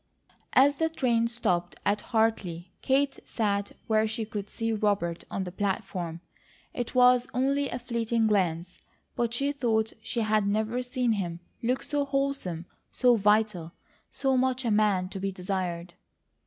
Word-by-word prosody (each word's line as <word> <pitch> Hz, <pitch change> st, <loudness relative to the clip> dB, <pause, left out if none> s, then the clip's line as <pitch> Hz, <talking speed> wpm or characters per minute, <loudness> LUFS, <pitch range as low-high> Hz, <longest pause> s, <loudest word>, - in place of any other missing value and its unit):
As 280 Hz, +2 st, +5 dB
the 320 Hz, 0 st, +2 dB
train 235 Hz, -7 st, +1 dB
stopped 180 Hz, -7 st, -1 dB
at 205 Hz, +1 st, +2 dB
Hartley, 195 Hz, -7 st, 0 dB
Kate 270 Hz, +1 st, +1 dB
sat 200 Hz, -3 st, -1 dB
where 220 Hz, 0 st, +2 dB
she 220 Hz, +1 st, -3 dB
could 205 Hz, -1 st, -5 dB
see 225 Hz, 0 st, -2 dB
Robert 205 Hz, -5 st, 0 dB
on 195 Hz, -, -2 dB
the 180 Hz, -, -6 dB
platform. 185 Hz, -4 st, -3 dB, 0.5 s
It 245 Hz, +1 st, -4 dB
was 250 Hz, 0 st, +5 dB
only 275 Hz, +2 st, +1 dB
a -, -, -3 dB
fleeting 235 Hz, -2 st, 0 dB
glance, 180 Hz, -4 st, 0 dB, 0.4 s
but 235 Hz, -1 st, 0 dB
she 275 Hz, +4 st, 0 dB
thought 225 Hz, -6 st, 0 dB
she 235 Hz, +1 st, -2 dB
had 215 Hz, -2 st, +2 dB
never 220 Hz, +4 st, 0 dB
seen 250 Hz, -1 st, 0 dB
him 175 Hz, -5 st, -2 dB, 0.2 s
look 255 Hz, +3 st, 0 dB
so 290 Hz, -1 st, 0 dB
wholesome, 275 Hz, -, -2 dB, 0.3 s
so 250 Hz, -2 st, +4 dB
vital, 210 Hz, -5 st, +2 dB, 0.4 s
so 270 Hz, -1 st, 0 dB
much 260 Hz, 0 st, +1 dB
a 230 Hz, -, +1 dB
man 205 Hz, -3 st, +2 dB
to 195 Hz, -, -6 dB
be 195 Hz, +1 st, -2 dB
desired. 180 Hz, -2 st, -3 dB
220 Hz, 155 wpm, -28 LUFS, 195-250 Hz, 0.5 s, As